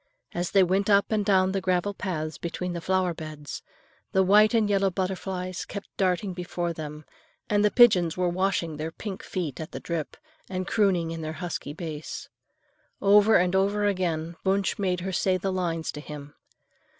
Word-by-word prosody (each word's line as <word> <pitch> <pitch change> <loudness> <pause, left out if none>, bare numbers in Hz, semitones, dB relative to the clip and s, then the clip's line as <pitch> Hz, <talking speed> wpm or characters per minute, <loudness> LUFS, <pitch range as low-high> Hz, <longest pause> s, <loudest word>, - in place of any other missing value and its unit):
As 175 0 -1
they 195 - +5
went 190 +3 +1
up 200 +1 +4
and 215 -1 +2
down 190 -2 +3
the 195 0 -1
gravel 185 +2 +1
paths 155 -5 -4
between 175 +1 -3
the 170 - -4
flowerbeds, 165 -5 -2 0.5
the 190 - +4
white 210 +4 +5
and 220 -2 +3
yellow 195 -1 +2
butterflies 185 0 -3
kept 200 - -8
darting 185 0 0
before 175 -1 -3
them, 150 -1 -7 0.5
and 205 0 +3
the 210 - +5
pigeons 185 -9 +5
were 180 -1 +1
washing 175 -3 0
their 155 +2 -4
pink 195 +2 -6
feet 170 -8 -4
at 160 +3 -8
the - - -4
drip 165 -3 -4 0.3
and 185 -1 -3
crooning 185 -6 +2
in 165 0 -5
their 155 0 -4
husky 165 -4 -5
bass. 160 -2 -6 0.7
Over 205 +2 +6
and 180 +1 +2
over 200 +2 +2
again 170 -4 -1
Wunsch 195 +1 +1
made 180 -3 0
her 190 +2 -3
say 185 0 +1
the 190 +1 -2
lines 170 -3 -1
to - - -8
him. 145 -1 -9
185 Hz, 175 wpm, -26 LUFS, 165-195 Hz, 0.7 s, Over